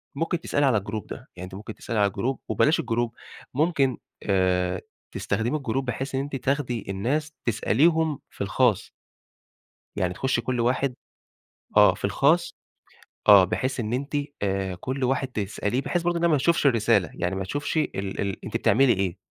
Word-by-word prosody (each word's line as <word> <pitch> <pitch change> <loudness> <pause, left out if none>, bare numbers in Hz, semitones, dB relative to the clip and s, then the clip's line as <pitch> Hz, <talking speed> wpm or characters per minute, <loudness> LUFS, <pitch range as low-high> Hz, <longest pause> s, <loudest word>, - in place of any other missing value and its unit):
ممكن 165 +3 -1
تسألي 145 0 +1
على 125 -5 +4
الGroup 105 0 -5
ده. - - -6 0.2
يعني 90 +1 -7
أنتِ 95 - -10
ممكن 105 +2 -8
تسألي 115 -3 -3
على 100 -1 +3
الGroup 120 +7 -2
وبلاش 155 +2 +3
الGroup، 120 0 -1 0.4
ممكن 140 -3 +1 0.3
آآ 90 -2 +1 0.3
تستخدمي 115 +9 -1
الGroup 135 0 -1
بحيث 130 +2 -3
إن 135 - +1
أنتِ 140 0 -5
تاخدي 130 -3 -1
الناس 140 +11 -1
تسأليهم 155 +7 +2
في - - -12
الخاص. 105 +1 +1 1.1
يعني 90 -1 0
تخُشّي 130 +3 0
كل 125 0 -2
واحد 125 +2 +1 0.8
آه. - - +7
في - - -4
الخاص - - +2 0.7
آه. 100 -2 +9
بحيث 130 +8 -1
إن 110 -1 -2
أنتِ 140 +4 -3 0.3
آآ 95 -2 -1
كل 130 +8 -4
واحد 135 +1 +1
تسأليه 105 +1 -2
بحيث 175 +5 -1
برضه 175 0 +1
إنّها 170 - +3
ما 150 - +4
تشوفش 165 +2 +2
الرسالة. 110 - +3
يعني 90 +2 -2
ما 95 - -2
تشوفش 145 - -3
ال 100 -10 -2
ال 100 -1 -3
أنتِ - - -2
بتعملي 125 +4 +4
إيه 95 -4 -2
120 Hz, 170 wpm, -25 LUFS, 100-135 Hz, 1.1 s, آه